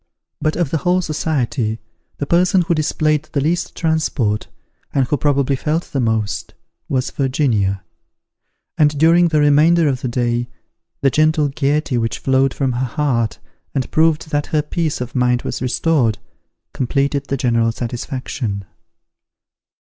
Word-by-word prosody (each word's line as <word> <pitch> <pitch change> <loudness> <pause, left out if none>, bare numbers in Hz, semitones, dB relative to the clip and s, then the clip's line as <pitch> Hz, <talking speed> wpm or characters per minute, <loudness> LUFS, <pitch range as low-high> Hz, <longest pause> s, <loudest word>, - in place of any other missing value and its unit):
But 155 - 0
of 170 -5 -1
the 160 - 0
whole 180 +4 +2
society, 140 -8 -1 0.4
the 145 - -2
person 180 +4 +3
who 170 - +1
displayed 155 -1 0
the 140 - +1
least 165 +5 -1
transport, 155 -10 0 0.5
and 135 -2 +3
who 140 - 0
probably 140 -2 +1
felt 155 +5 -1
the 140 - -1
most, 110 -3 -1 0.3
was 130 -1 -1
Virginia; 120 -9 0 1.0
and 150 -1 +3
during 165 +3 +5
the 155 -2 +1
remainder 155 +3 +4
of 135 -2 -1
the - - -2
day, 120 0 -1 0.5
the 135 - +3
gentle 155 0 +2
gaiety 140 -2 0
which 115 0 -1
flowed 135 0 +2
from 135 -1 -1
her 125 +2 -1
heart, 120 -5 0 0.4
and 130 -2 -2
proved 160 -1 +2
that 145 -1 0
her 150 -1 0
peace 155 -2 -2
of 125 0 -5
mind 125 -1 +1
was - - -4
restored, 130 -3 +1 0.6
completed 140 +2 0
the 140 - -1
general 115 -2 +2
satisfaction. 120 -3 -4
140 Hz, 145 wpm, -19 LUFS, 125-155 Hz, 1.0 s, during